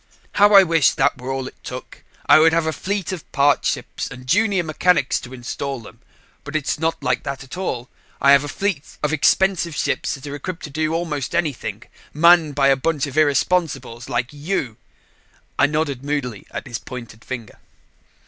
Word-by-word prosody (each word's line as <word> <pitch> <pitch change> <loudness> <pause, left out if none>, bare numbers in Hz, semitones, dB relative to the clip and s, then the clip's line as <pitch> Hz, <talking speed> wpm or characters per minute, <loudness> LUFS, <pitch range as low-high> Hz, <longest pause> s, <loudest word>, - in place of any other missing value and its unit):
"How 205 0 +5
I 195 - +10
wish 165 -4 +3
that 135 -1 +1
were 130 +1 -4
all 135 -1 -3
it - - -14
took! - - -8 0.2
I - - +7
would 160 +1 +5
have 165 -1 +2
a 160 - -1
fleet 195 0 -3
of 180 -4 -7
parts 140 0 +3
ships - - -4
and 125 0 -10
junior 200 - +2
mechanics 160 -2 +2
to 125 - -11
install 130 +2 -5
them. 115 - -14 0.4
But 145 +2 -8
its 150 -1 -1
not 160 -2 -1
like 125 - +1
that 140 -1 -5
at 135 - -9
all. 130 -10 -3 0.3
I 140 - +5
have 140 0 +6
a - - -5
fleet 175 0 -3
of 150 +1 +1
expensive 170 +1 +2
ships - - -1
that 135 - -11
are 145 - -6
equipped 165 +5 -6
to 150 - -7
do 155 +2 -1
almost 160 -4 -3
anything 120 -10 -2 0.3
manned 165 -2 +5
by 140 -1 +4
a 135 - +5
bunch 145 +2 0
of 140 -2 -8
irresponsibles 145 -5 +1
like 120 +3 -2
you." 145 - -3 0.8
I 145 - +6
nodded 145 -3 -2
moodily 140 -7 -3
at - - -6
his 120 -3 -5
pointing 115 -4 -9
finger. 115 -2 -8
145 Hz, 190 wpm, -21 LUFS, 130-165 Hz, 0.8 s, I